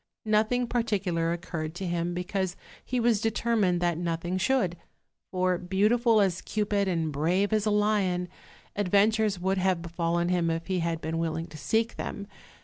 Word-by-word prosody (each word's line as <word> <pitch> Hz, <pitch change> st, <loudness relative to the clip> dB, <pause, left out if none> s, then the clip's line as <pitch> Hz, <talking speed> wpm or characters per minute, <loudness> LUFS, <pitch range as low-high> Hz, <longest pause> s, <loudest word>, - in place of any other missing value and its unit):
Nothing 220 Hz, +3 st, +2 dB
particular 195 Hz, -9 st, 0 dB
occurred 170 Hz, -2 st, -4 dB
to 190 Hz, -, -4 dB
him, 175 Hz, 0 st, -1 dB
because 180 Hz, +1 st, -2 dB, 0.3 s
he 250 Hz, -, -2 dB
was 230 Hz, -3 st, +2 dB
determined 225 Hz, -5 st, +1 dB
that 175 Hz, -2 st, +1 dB
nothing 175 Hz, +1 st, -2 dB
should; 210 Hz, -5 st, +1 dB, 0.5 s
for, 185 Hz, -1 st, 0 dB
beautiful 215 Hz, +5 st, +3 dB
as 185 Hz, -3 st, +1 dB
Cupid 205 Hz, -2 st, 0 dB
and 165 Hz, -4 st, 0 dB
brave 180 Hz, +8 st, +1 dB
as 215 Hz, 0 st, +1 dB
a -, -, +4 dB
lion, 205 Hz, -4 st, +1 dB, 0.5 s
adventures 205 Hz, +1 st, +2 dB
would 190 Hz, +2 st, 0 dB
have 185 Hz, -2 st, +1 dB
befallen 170 Hz, 0 st, -1 dB
him 175 Hz, -2 st, +1 dB
if 165 Hz, 0 st, -2 dB
he 185 Hz, -1 st, -1 dB
had 165 Hz, -1 st, -1 dB
been 160 Hz, +1 st, -2 dB
willing 165 Hz, 0 st, -2 dB
to -, -, -12 dB
seek 225 Hz, +8 st, 0 dB
them. 200 Hz, -, -5 dB
185 Hz, 160 wpm, -28 LUFS, 170-210 Hz, 0.5 s, a